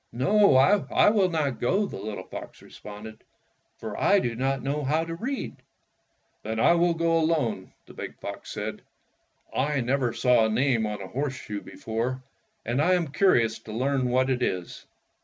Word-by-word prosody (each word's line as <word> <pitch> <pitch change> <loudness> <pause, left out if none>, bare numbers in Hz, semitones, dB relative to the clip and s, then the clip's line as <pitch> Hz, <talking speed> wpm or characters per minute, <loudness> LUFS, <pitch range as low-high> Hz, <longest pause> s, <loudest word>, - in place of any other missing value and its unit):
"No, 140 - +4
I 195 +9 +4
will 200 -4 +3
not 150 -6 -1
go," 190 +12 +1
the 195 - -7
little 100 -2 -5
fox - - -10
re - - -16
sponded, 105 +1 -10 0.6
"for 110 -2 -6
I 200 - +5
do 120 -11 0
not 135 +2 -1
know 145 +2 -2
how 155 +4 +1
to 165 - -5
read." 230 - -4 0.8
"Then 110 +1 -4
I 170 - +5
will 170 0 +2
go 165 0 +2
alone," 150 - 0
the - - -14
big - - -7
fox - - -7
said. - - -5 0.7
"I 145 +2 +1
never 125 0 0
saw 120 -1 +3
a - - +1
name 115 -1 +1
on 105 -2 -5
a - - -7
horseshoe 130 -3 -4
before, 120 +4 -4 0.4
and 120 +5 0
I 185 +4 +4
am 170 -4 -1
curious 120 - +2
to 110 - -11
learn 130 +2 0
what 130 +2 +2
it 130 -1 -1
is." 90 -7 -3
130 Hz, 175 wpm, -26 LUFS, 115-165 Hz, 0.8 s, I